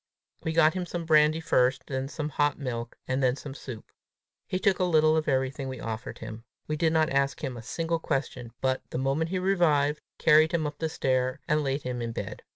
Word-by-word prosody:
We 160 - -1
got 160 -1 +5
him 180 -2 -3
some 170 -1 -4
brandy 155 0 +5
first, 130 -5 +2
then 135 -1 -3
some 150 +1 -4
hot 145 0 +1
milk, 120 -4 -5
and 130 +1 0
then 125 -1 +3
some 140 -1 -8
soup. 130 -5 -9 0.6
He 185 - -1
took 195 -1 +2
a - - +2
little 155 -3 +4
of 160 -1 0
everything 135 0 0
we 130 -2 -5
offered 115 +3 -5
him. 110 +1 -8 0.2
We 155 - -2
did 160 +1 +2
not 160 -1 +2
ask 140 0 0
him 130 - -3
a 120 - -7
single 165 +7 -2
question, 135 -6 -3
but, 130 0 +1
the - - -4
moment 135 +5 0
he 185 - -1
revived, 160 -6 +2 0.2
carried 155 +1 +5
him 160 -2 0
up 145 0 -5
the 160 - -1
stair, 130 -3 0
and 150 0 +2
laid 135 +1 -1
him 125 -1 -3
in 115 -1 -3
bed. - - -5
145 Hz, 220 wpm, -28 LUFS, 130-160 Hz, 0.6 s, got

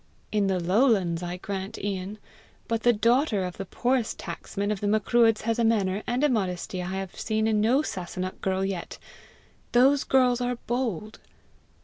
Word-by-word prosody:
"In 210 -2 +2
the 190 -1 +1
lowlands, 185 -2 +2
I 175 0 -4
grant, 195 +2 -5
Ian; 195 +1 -4 0.5
but 230 -1 -1
the 240 - +5
daughter 230 -1 +2
of 180 -1 -5
the 195 - -5
poorest 250 +1 0
tacksman 205 +1 -4
of 205 - -3
the 205 - 0
Macruadhs 220 +1 +3
has 230 +1 -1
a - - +3
manner 205 -3 +1
and 245 +3 0
a 295 - +4
modesty 185 -5 -2
I 185 +2 -4
have 190 -1 -6
seen 220 0 0
in 215 -1 +2
no 250 +7 +3
Sasunnach 185 - -5
girl 190 0 0
yet. 190 -3 -4 0.8
Those 265 +3 +5
girls 250 -2 +3
are 245 0 0
bold!" 225 -4 -2
210 Hz, 170 wpm, -26 LUFS, 190-240 Hz, 0.8 s, the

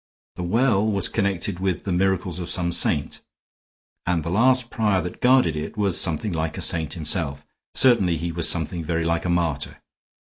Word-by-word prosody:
The - - -6
well 105 +3 +2
was 100 -3 +1
connected 100 -3 -1
with 95 -2 -2
the 100 - -3
miracles 90 -1 0
of 85 -1 -5
some 85 -2 +1
saint, 80 -4 +1 0.9
and 85 -3 0
the 85 - -4
last 125 +4 +2
prior 105 -4 +1
that 90 0 -6
guarded 125 -11 +4
it 75 +6 -6
was 100 -4 +2
something 85 +5 -1
like 80 -1 -3
a - - -4
saint 80 -3 +1
himself; 75 -3 -2 0.3
certainly 100 -10 +4
he 85 +2 -3
was 85 -1 +1
something 85 0 -2
very 80 +1 -1
like 85 +1 -1
a - - -1
martyr. 85 -4 -1
90 Hz, 180 wpm, -23 LUFS, 80-100 Hz, 0.9 s, guarded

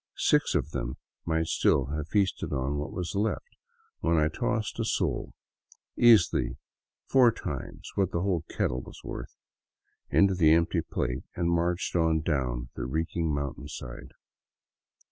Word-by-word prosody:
Six - - +3
of 75 - 0
them 65 -3 -3 0.3
might 80 0 +1
still 70 -3 +2
have 75 0 -3
feasted 100 0 0
on 70 +1 -1
what 75 - -4
was 85 -3 -4
left 105 +2 -2 0.4
when 85 0 +2
I 75 0 +3
tossed 110 +3 -2
a - - +1
sol, 110 - -1 0.6
easily 85 - +5 0.5
four 125 -3 +5
times - - -6
the 95 -1 +2
whole 90 -4 +1
kettle's 60 0 -3
worth, - - -7 0.7
into 100 -1 +4
the 80 -4 +5
empty 85 0 +2
plate 60 +1 -3
and 85 -1 0
marched 85 +2 0
on 80 -2 +3
down 65 -6 -1
the - - -4
reeking 80 +3 -1
mountainside. 70 -3 -5
80 Hz, 135 wpm, -28 LUFS, 70-90 Hz, 0.7 s, easily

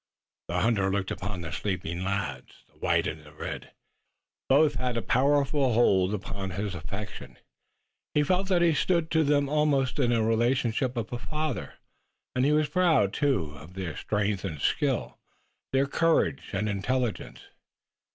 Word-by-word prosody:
The 90 +1 -1
hunter 100 -3 +2
looked 100 -1 -1
upon 100 -1 -4
the 80 -2 -6
sleeping 90 -1 -3
lads, 95 -10 -4
the - - -29
white - - +2
and 80 0 -4
the 75 -1 -15
red. 75 - -6 0.8
Both 145 +2 +5
had 125 -2 -1
a - - 0
powerful 140 0 +2
hold 100 -4 +3
upon 100 -1 -5
his 100 +2 -3
affection. 100 +5 -7 0.8
He 150 - +4
felt 185 +5 +1
that 175 -2 +3
he 170 -2 +4
stood 165 +4 +1
to 160 0 +3
them 145 -1 +2
almost 140 -3 +1
in 125 -3 +3
the 115 -2 +2
relationship 120 +2 +1
of 115 0 -3
a 120 - -3
father, 155 0 -3 0.6
and 130 +1 +2
he 145 - +3
was 150 0 +3
proud, 155 - +3
too, 130 - +1
of 75 +6 -13
their 90 -6 -4
strength 105 +2 -1
and 80 -7 -4
skill, - - 0 0.5
their 135 +1 +3
courage 160 0 +1
and 105 +2 -1
intelligence. 115 +4 -2
120 Hz, 160 wpm, -28 LUFS, 95-145 Hz, 0.8 s, Both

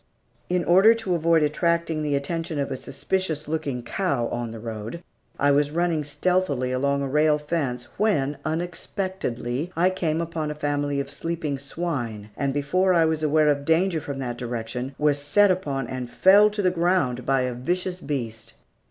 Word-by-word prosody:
In 180 -1 +1
order 195 +6 +6
to 225 -5 -2
avoid 165 -1 +3
attracting 165 +1 +1
the 145 -2 0
attention 165 +3 -2
of 140 - -2
a - - -1
suspicious 160 +1 -3
looking 150 -6 -2
cow 140 -2 -1
on 120 -1 -3
the 115 - -7
road, 115 +7 -6 0.3
I 145 0 +3
was 145 +1 +3
running 165 -1 0
stealthily 145 -3 0
along 140 +2 +1
a - - -1
rail 150 +2 +3
fence, 150 -5 -2
when, 150 -10 +1
unexpectedly, 165 - -3
I 180 +3 +3
came 165 -4 -1
upon 165 -2 -3
a 150 - -4
family 145 -1 -1
of 140 0 -4
sleeping 160 -4 -3
swine, 130 -9 -4
and 140 -1 -1
before 180 +7 +2
I 165 -1 +5
was 160 -1 0
aware 155 0 +3
of 140 -1 +1
danger 165 +2 +2
from 140 -1 -5
that 120 -3 -4
direction 125 +2 -4
was 150 -1 +2
set 190 +8 +4
upon 140 -8 -2
and 125 0 -5
felled 200 +10 +5
to 210 -1 -2
the 185 - +3
ground 170 -8 +1
by 135 +1 +2
a 125 -1 -1
vicious 180 +9 -2
beast. 115 -8 -5
150 Hz, 175 wpm, -24 LUFS, 135-175 Hz, 0.3 s, order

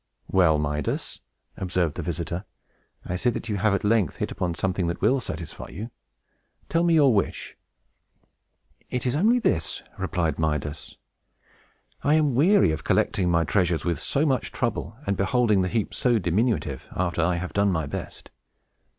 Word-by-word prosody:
"Well, 90 -5 +4
Midas," 75 -1 -2 0.4
observed 90 -4 -1
his - - -5
visitor, 85 +3 -3 0.6
"I 90 - -3
see 95 +7 +1
that 115 -1 -4
you 105 - 0
have 100 0 +2
at - - -3
length 105 -5 +2
hit - - -3
upon 85 -2 -2
something 90 +2 -1
that 85 - -3
will 135 - +3
satisfy 85 -8 -6
you. 110 +7 -7 0.8
Tell 165 +3 +2
me 170 -1 +4
your 140 -5 +5
wish." 100 -3 -1 1.3
"It 125 -1 -2
is 125 - +1
only 220 +10 +4
this," 80 - 0 0.2
replied 90 -4 -1
Midas. 75 -1 -2 1.1
"I 145 +2 +4
am 150 -4 +3
weary 150 - +4
of 80 - -4
collecting 90 -3 +1
my 85 -1 +3
treasures 85 +2 +1
with 85 -2 0
so 145 +3 +1
much 135 -4 0
trouble, 115 -2 -2
and 100 - 0
beholding 105 0 +2
the 90 - 0
heap 110 0 -1
so 120 -2 +2
diminutive, 90 - 0
after 85 -2 0
I 85 +2 +2
have 90 +1 -4
done 100 0 +2
my 80 -4 -1
best. 70 - -7
95 Hz, 165 wpm, -25 LUFS, 85-120 Hz, 1.3 s, your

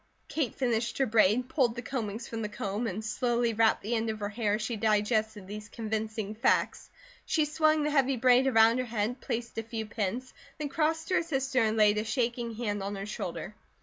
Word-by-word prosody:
Kate 295 -7 -2
finished 235 -3 0
her 270 - +3
braid, 225 +2 +3
pulled 250 -5 +1
the 240 - -4
combings 230 -3 -4
from 225 -1 -5
the 210 - -3
comb 205 +3 -3
and 215 +2 -4
slowly 235 +1 0
wrapped 220 0 +3
the 220 +4 -2
end 225 -1 0
of 215 0 -3
her 205 -1 -2
hair 210 -1 0
as 215 - -4
she 230 +1 -2
digested 215 -1 +1
these 210 +2 -8
convincing 220 -2 -3
facts. 230 +4 +1 0.3
She 310 -2 +1
swung 310 0 +2
the 300 - 0
heavy 275 -2 +2
braid 250 +2 +5
around 225 -1 +5
her 255 - -1
head, 230 +2 -2
placed 230 0 -3
a - - -3
few 225 0 -4
pins, 215 +4 -3 0.2
then 300 -2 -3
crossed 320 +2 0
to - - 0
her 370 - +4
sister 270 -5 0
and 220 0 +1
laid 210 -1 +5
a - - -1
shaking 235 -1 -1
hand 210 -3 -2
on 200 +1 -3
her 195 0 -5
shoulder. 210 - -5
230 Hz, 215 wpm, -29 LUFS, 215-255 Hz, 0.3 s, braid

